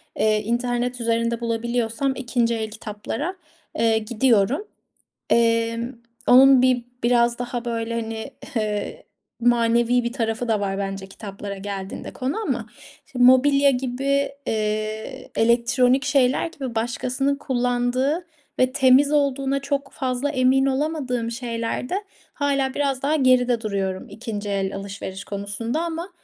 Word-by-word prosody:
eee, 215 0 +2
internet 245 +1 -1
üzerinde 230 0 0
bulabiliyorsam 235 +3 -1
2'nci 235 -2 0
el 220 -1 -3
kitaplara, 225 - -5 0.4
eee, 225 -1 +3
gidiyorum. 235 - +1 0.6
Emm, 230 +1 +2 0.3
onun 265 +1 +8
bir 255 -2 +2 0.2
biraz 235 0 +3
daha 245 -1 -4
böyle 230 0 -2
hani 225 +4 -6 0.2
ı 225 - +2
hı 210 -1 -1 0.7
manevi 240 +1 +3
bir 235 +1 -3
tarafı 230 -1 -2
da 220 -2 +1
var 195 -1 -2
bence 195 -1 -4
kitaplara 200 0 -7
geldiğinde 195 -1 -6
konu 265 +9 -2
ama. - - -2 0.4
Şimdi 250 -1 +3
mobilya 275 +2 +6
gibi, 275 +2 0 0.2
eee, 215 0 -3
elektronik 245 +3 +3
şeyler 270 +1 +2
gibi 270 -8 -7
başkasının 250 +4 0
kullandığı 255 +4 0 0.3
ve 255 0 +3
temiz 270 +1 +5
olduğuna 275 -2 +1
çok 275 0 -3
fazla 260 +1 -2
emin 265 0 +3
olamadığım 265 -4 -1
şeylerde 240 - -3 0.3
hâlâ 275 -2 0
biraz 275 -2 -1
daha 295 +3 +1
geride 250 -4 +3
duruyorum 195 -3 -2
2'nci 210 -3 -5
el 195 -1 -1
alışveriş 195 0 -6
konusunda 205 +8 -3
ama, 340 +2 -4
245 Hz, 125 wpm, -23 LUFS, 225-265 Hz, 0.7 s, onun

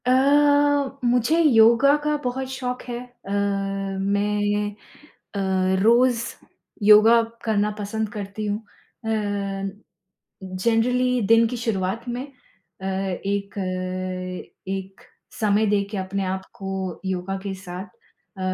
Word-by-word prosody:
अ, 250 - +3 0.9
मुझे 245 +7 +3
योगा 240 0 +6
का 300 0 +1
बहुत 260 +1 -2
शौक 250 -1 -3
है 240 -1 -5 0.3
अ, 195 - -6
मैं 200 +1 0 0.6
अ, 190 -1 +1
रोज़ 235 +1 +4 0.6
योगा 215 +3 +7 0.2
करना 210 -1 +1
पसंद 215 +1 -2
करती 205 +1 -5
हूँ। 205 0 0 0.5
अ, - - -2 1.4
जनरली 235 +6 +1
दिन 230 0 +6
की 245 - -4
शुरुआत 220 -2 -2
में 245 +1 -3
अ, 255 -7 -15
एक 195 +1 -2 1.1
एक 195 0 -5 0.4
समय 215 0 +3
देके 205 0 0
अपने 190 +1 -2
आप 190 0 -3
को 190 -2 -4
योगा 190 +1 -2
के 195 -1 -3
साथ 185 0 -7
अ, 180 -1 -20
205 Hz, 110 wpm, -23 LUFS, 195-235 Hz, 1.4 s, योगा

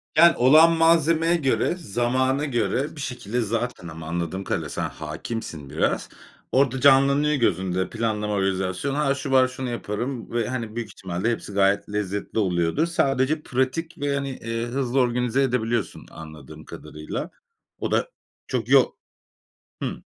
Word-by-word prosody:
Yani, 170 +1 +7
olan 155 +7 +7
malzemeye 165 0 +3
göre, 155 +2 +1
zamana 130 - 0
göre 135 +3 -1
bir 145 - -7
şekilde, 125 -2 -3
zaten 115 -4 -3
ama 80 -1 -8
anladığım 85 +3 -3
kadarıyla, - - -2
sen - - -3
hâkimsin 80 -1 -6
biraz, - - -1 0.4
orada 135 -1 +2
canlanıyor 140 +2 +5
gözünde, 95 - 0
planlama 110 -2 -2
organizasyon. 95 +6 -1
"Ha, 140 -2 +1
şu 135 0 -5
var 130 -1 +5
şunu 130 0 -5
yaparım." 120 +2 -4
Ve, 120 -1 0
hani, 115 -4 -4
büyük 115 -2 -4
ihtimalle 95 +3 -3
hepsi 105 -3 -5
gayet 100 +1 +2
lezzetli 105 +1 -3
oluyordur. 90 - +1
Sadece 150 -2 +1
pratik 130 +6 -2
ve, 140 0 -1
hani, 140 -2 -4
ııı, 115 0 -2
hızlı 130 +1 -1
organize 125 +1 +1
edebiliyorsun, 120 -4 -1
anladığım 80 -4 -11
kadarıyla. 75 0 -7 0.5
O - - -3
da, - - +1 0.4
çok - - -2
yo - - +5 0.9
Hı. - - -4
120 Hz, 145 wpm, -24 LUFS, 100-140 Hz, 0.9 s, Yani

